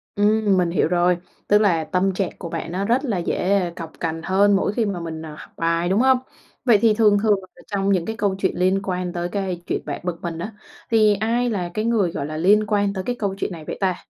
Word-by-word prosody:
Ừm, 205 -1 +3
mình 175 -2 +1
hiểu 175 - +2
rồi. 175 0 +2 0.3
Tức 205 - +5
là 170 -6 +2
tâm 185 +4 0
trạng 190 -1 -1
của 170 - -6
bạn 165 0 -5
nó 195 +2 -2
rất 250 +6 +1
là 215 -7 -1
dễ 180 +1 0
cộc 165 -2 -7
cằn 165 -1 -3
hơn 200 +1 +3
mỗi 195 +1 0
khi 225 -1 0
mà 195 -4 -2
mình, 160 -1 -6
à, 150 -1 -8
học - - -12
bài, 165 +1 0
đúng 195 +4 +2
hông? 260 -1 +5 0.5
Vậy 230 -4 +6
thì 225 -2 +5
thường 210 -2 +4
thường 210 -3 +3 0.2
ở - - -16
trong 200 -1 0
những 180 -3 +1
cái 220 - -4
câu 200 -3 0
chuyện 190 - +1
liên 185 +2 +2
quan 180 -2 -3
tới 175 0 -3
cái 190 -4 -3
chuyện - - -1
bạn 145 - -5
bực 175 -2 -4
mình 165 -1 -4
á, 205 +5 -5 0.4
thì 215 -2 +5
ai 235 +4 0
là 180 -5 -2
cái 215 +1 -2
người, 215 -7 +2
gọi 140 - -4
là, 155 +1 -5
liên 205 +5 +4
quan 205 -1 +1
tới 190 - -4
cái 245 +5 -2
câu 200 -2 -1
chuyện 200 - -3
này 160 -3 -8
vậy - - -5
ta? 185 -2 +1
190 Hz, 260 wpm, -22 LUFS, 175-210 Hz, 0.5 s, Vậy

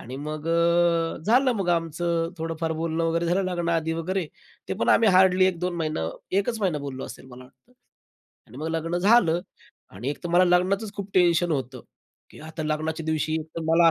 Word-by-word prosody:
आणि 125 +3 -8
मग 150 +2 -6
अ, 170 0 +2
झालं 255 +4 +4
मग 195 -3 -2
आमचं 165 0 0
थोडंफार 165 0 -3
बोलणं 165 0 -1
वगैरे 165 +1 0
झालं 180 +3 +1
लग्नाआधी 170 -2 -1
वगैरे, 175 +2 -2 0.4
ते - - -1
पण - - 0
आम्ही 225 - +5
हार्डली 185 0 +5
1-2 180 -1 -1
महिना, 155 - -2 0.3
1च 220 +2 -2
महिना 175 -7 0
बोललो 135 -2 -6
असेल - - -10
मला 125 +1 -12
वाटतं 180 - -24 0.7
आणि 120 - -14
मग 155 +2 -3
लग्न 165 +1 -2
झालं. 180 -4 +4 0.5
आणि 110 +8 -5
एक 145 - -7
तर - - -2
मला 180 +1 +6
लग्नाचच 190 +4 +1
खूप 200 -1 -6
टेन्शन 175 -1 +3
होतं 130 -3 -3 0.5
की - - -15
आता 155 +1 -7
लग्नाच्या 155 +1 -2
दिवशी 155 0 -1
एक 155 - -9
तर - - -2
मला 165 +1 +5
165 Hz, 185 wpm, -25 LUFS, 155-180 Hz, 0.7 s, मला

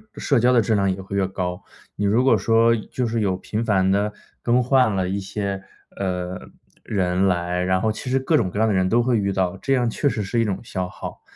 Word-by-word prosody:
社 140 -5 +1
交 125 +2 +4
的 120 - +5
质 110 - 0
量 100 -1 +2
也 95 +1 -4
会 95 +1 -6
越 95 -1 +1
高。 90 -1 -4 0.3
你 105 - -2
如 110 +5 +3
果 130 -4 +4
说 115 +3 +3
就 120 +3 -3
是 115 0 -1
有 100 -4 +1
频 105 +4 -4
繁 95 -4 +2
地 100 +2 +1 0.3
更 125 +1 +2
换 125 -4 +3
了 95 -1 -1
一 100 +2 -1
些， 100 0 -4 0.4
呃， 90 -1 -3 0.4
人 95 -2 0
来， 90 -1 0
然 95 0 +1
后 110 - +1
其 110 +4 -6
实 130 - +2
各 150 +4 +2
种 95 -8 0
各 100 - -4
样 110 - +3
的 110 - +1
人 95 -1 +2
都 120 +3 +3
会 120 -1 +2
遇 100 -2 0
到， 95 0 -1
这 135 +7 -1
样 125 -3 +2
确 130 - -1
实 110 -5 -1
是 110 +5 -1
一 115 - +2
种 100 -3 -2
消 95 -5 -3
耗。 - - -9
100 Hz, 265 characters per minute, -22 LUFS, 95-115 Hz, 0.4 s, 的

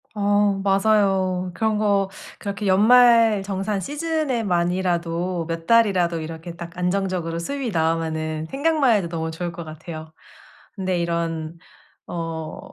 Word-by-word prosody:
어 205 -1 +2
맞아요. 195 -2 +2
그런 220 -1 0
거 200 -2 +2 0.3
그렇게 200 0 -4
연말 225 +1 +6
정산 195 +1 -2
시즌에만이라도 185 - -1
몇 165 -1 -4
달이라도 190 -7 +3
이렇게 165 +2 -7
딱 170 0 -9
안정적으로 180 -2 -1
수입이 265 +6 -3
나오면은 160 -2 -1
생각만 285 -3 +2
해도 195 -5 0
너무 160 -1 -3
좋을 175 +2 -4
것 170 0 -7
같아요. 160 0 -9 0.6
근데 185 -3 -1
이런 170 -1 -2 0.5
어 165 -2 -5
185 Hz, 285 characters per minute, -23 LUFS, 165-210 Hz, 0.6 s, 연말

